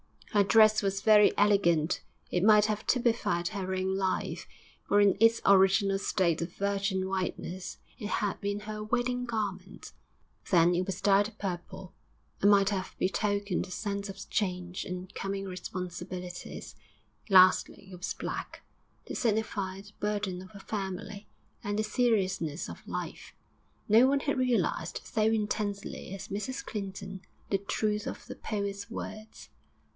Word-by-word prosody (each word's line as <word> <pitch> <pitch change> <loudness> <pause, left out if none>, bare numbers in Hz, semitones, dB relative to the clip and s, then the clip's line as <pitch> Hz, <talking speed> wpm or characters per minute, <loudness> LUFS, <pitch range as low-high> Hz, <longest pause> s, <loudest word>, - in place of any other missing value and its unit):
Her 205 -2 +4
dress 215 +1 +6
was 195 0 -1
very 210 -1 +6
elegant; 180 -5 +3 0.3
it 180 - +1
might 210 0 +7
have 215 0 -2
typified 225 -8 +1
her 190 -3 -3
own 190 +1 0
life, 190 -1 -2 0.4
for 205 - +4
in 200 -2 +5
its 225 +1 +5
original 195 0 +5
state 170 -4 +1
of 170 +1 -4
virgin 200 -1 -1
whiteness 185 -1 -4 0.2
it 210 - -4
had 205 -2 -1
been 205 +1 -2
her 215 0 -6
wedding 245 +3 0
garment; 200 -5 -4 0.6
then 175 -1 +5
it 180 +1 0
was 190 -1 -4
dyed 205 +1 +4
purple, 190 0 -6 0.5
and 200 - +6
might 200 -1 +5
have 190 -2 -3
betokened 200 +1 0
a - - -12
sense 200 +1 -3
of 195 0 -8
change 180 -2 -2
and 180 +1 -6
coming 195 0 -3
responsibilities; 180 -1 -6 0.5
lastly 190 0 +5
it - - -8
was 180 - -4
black, - - -5 0.4
to - - -6
signify 205 -4 -1
the 200 0 -15
burden 205 -3 -2
of 185 - -11
a - - -8
family, 200 0 -5 0.4
and 205 0 -2
the 215 - +1
seriousness 195 - 0
of - - -11
life. - - -6 0.6
No 230 +5 +7
one 275 +1 +2
had 280 -2 0
realised 255 - 0
so 220 -3 -1
intensely 210 -3 -1
as 195 - -8
Mrs 215 +7 -4
Clinton 195 -2 -6 0.3
the 195 - +2
truth 210 +1 -1
of - - -6
the - - -8
poet's 200 -1 -4
words. 215 0 -8
200 Hz, 145 wpm, -30 LUFS, 185-210 Hz, 0.6 s, might